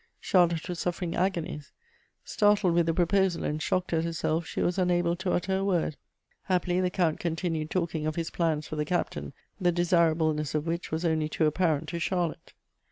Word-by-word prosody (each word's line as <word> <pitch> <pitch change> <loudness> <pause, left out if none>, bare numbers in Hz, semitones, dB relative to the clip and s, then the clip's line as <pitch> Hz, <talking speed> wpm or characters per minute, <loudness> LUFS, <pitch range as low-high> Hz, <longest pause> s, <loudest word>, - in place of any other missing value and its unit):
Charlotte 170 -3 +2
was 175 -2 -4
suffering 175 -1 -2
agonies. 170 -5 -2 0.5
Startled 205 -4 +3
with 170 -1 +2
the 165 - +2
proposal, 185 0 +2
and 150 +1 -2
shocked 180 0 -1
at 160 0 +2
herself, 165 0 -1
she - - -5
was 180 +2 0
unable 175 -1 +2
to 185 +1 -2
utter 190 +2 0
a 195 - -1
word. 175 -6 0 0.5
Happily, 180 -1 +1
the 180 - +1
Count 170 -3 0
continued 165 -2 -2
talking 165 -4 -1
of 155 - -2
his 165 -1 -3
plans 160 -3 0
for 155 - -5
the 150 - +1
Captain, 110 - -2 0.3
the 175 -1 +3
desirableness 165 -3 +2
of 150 0 0
which 170 +1 -3
was 160 +2 -2
only 160 -2 +1
too 155 - +1
apparent 155 -1 +1
to 170 - -3
Charlotte. 175 -2 -2
170 Hz, 185 wpm, -28 LUFS, 160-180 Hz, 0.5 s, Startled